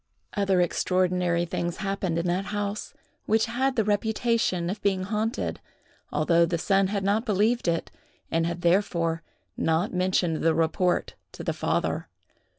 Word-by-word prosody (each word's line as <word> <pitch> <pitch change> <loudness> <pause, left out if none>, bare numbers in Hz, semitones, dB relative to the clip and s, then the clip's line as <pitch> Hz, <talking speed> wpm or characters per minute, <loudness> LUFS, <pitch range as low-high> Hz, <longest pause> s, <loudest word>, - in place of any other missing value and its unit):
Other 195 -3 +2
extraordinary 180 -1 +1
things 170 0 -3
happened 195 -4 -2
in 170 - -1
that 180 +2 0
house, 205 0 -3 0.3
which 220 0 +3
had 260 +3 0
the 225 - +2
reputation 215 -3 +1
of 200 +4 -4
being 190 -2 +1
haunted, 215 +3 -2 0.5
although 165 +3 +3
the 170 0 +1
son 195 +3 +2
had 200 0 -2
not 205 +3 +2
believed 215 +2 +1
it, 165 -1 0 0.4
and 165 0 +1
had 170 +1 -4
therefore 170 -2 +1 0.3
not 165 +5 0
mentioned 180 -3 +1
the 165 0 +2
report 165 +3 +1 0.2
to - - -8
the - - -1
father. - - -1
185 Hz, 150 wpm, -26 LUFS, 170-205 Hz, 0.5 s, which